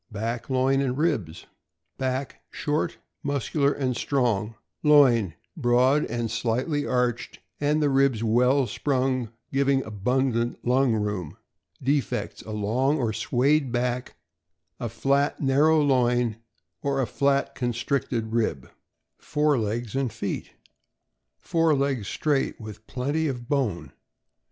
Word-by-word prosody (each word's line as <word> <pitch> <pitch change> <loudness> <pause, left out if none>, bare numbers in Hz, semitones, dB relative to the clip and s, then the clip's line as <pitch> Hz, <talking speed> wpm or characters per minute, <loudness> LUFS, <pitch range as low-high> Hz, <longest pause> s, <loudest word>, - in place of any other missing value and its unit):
Back, 115 +4 -4
loin, 135 +1 +2
and 130 -1 -1
ribs. 130 - -1 0.3
— - - -54
Back 130 +1 -3
short, 150 0 -2 0.2
muscular, 140 +1 0
and 130 -3 -1
strong. 115 -5 0 0.3
Loin 120 - +5 0.2
broad 130 0 +3
and 120 -2 -3
slightly 125 +6 -1
arched, 125 -2 -1 0.2
and 150 +1 +1
the 145 - +3
ribs 135 -4 +2
well 125 +4 +3
sprung, 130 0 -1 0.2
giving 135 -1 +2
abundant 120 +3 0
lung 125 0 +3
room. 105 -7 -3 0.5
Defects: 140 +1 -1
A - - -5
long 120 +8 +1
or 115 -6 -1
swayed 130 +5 +1
back, 125 0 -2 0.6
a 120 - -3
fiat, 140 +5 +1
narrow 150 +3 +4
loin, 125 -5 +2 0.4
or 140 -1 0
a 130 - +2
flat, 140 +4 +1
constricted 120 -1 -2
rib. 115 -2 -1 0.5
Fore 150 -3 +1
legs 110 +2 -3
and 135 -3 0
feet. 105 -2 -5 0.5
— - - -55
Fore 165 -2 +2
legs 135 -6 -1
straight, 145 -3 0
with 110 -1 -10
plenty 145 +5 -1
of 125 -4 -4
bone. 105 - -1
130 Hz, 125 wpm, -25 LUFS, 115-140 Hz, 0.6 s, Loin